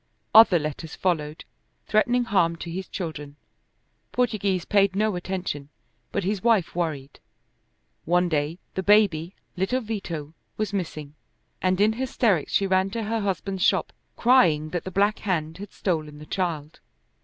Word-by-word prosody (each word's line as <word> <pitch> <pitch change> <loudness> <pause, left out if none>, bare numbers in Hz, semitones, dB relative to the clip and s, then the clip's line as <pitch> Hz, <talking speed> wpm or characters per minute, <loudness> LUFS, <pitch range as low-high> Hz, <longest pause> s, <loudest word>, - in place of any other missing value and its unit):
Other 220 -5 +8
letters 155 +1 -5
followed, 155 -4 -2 0.4
threatening 240 +3 +2
harm 180 -7 +2
to 170 0 -7
his 185 +2 -5
children. 150 -5 -6 0.8
Portoghese 205 -7 0
paid 200 -2 +3
no 215 -1 +1
attention, 175 -6 -4 0.4
but 200 - -1
his 195 +1 -1
wife 220 -8 +2
worried. 155 -6 -3 0.9
One 180 +2 +3
day 155 0 -1 0.2
the 190 - -2
baby, 195 -4 +3 0.2
little 195 +8 0
Vito, 170 -9 -5 0.2
was 215 -1 -2
missing, 155 -6 -4 0.5
and 185 0 +1
in 215 +2 +4
hysterics 230 - 0
she 200 - +2
ran 190 0 +2
to 225 +3 -4
her 225 +2 -1
husband's 195 -1 -2
shop - - +2 0.2
crying 165 -12 +4
that 175 - -3
the - - -3
Black 205 +3 +2
Hand 165 -4 -2
had 205 0 -8
stolen 155 -5 -2
the 150 - -11
child. 160 -4 -3
185 Hz, 145 wpm, -25 LUFS, 160-205 Hz, 0.9 s, Other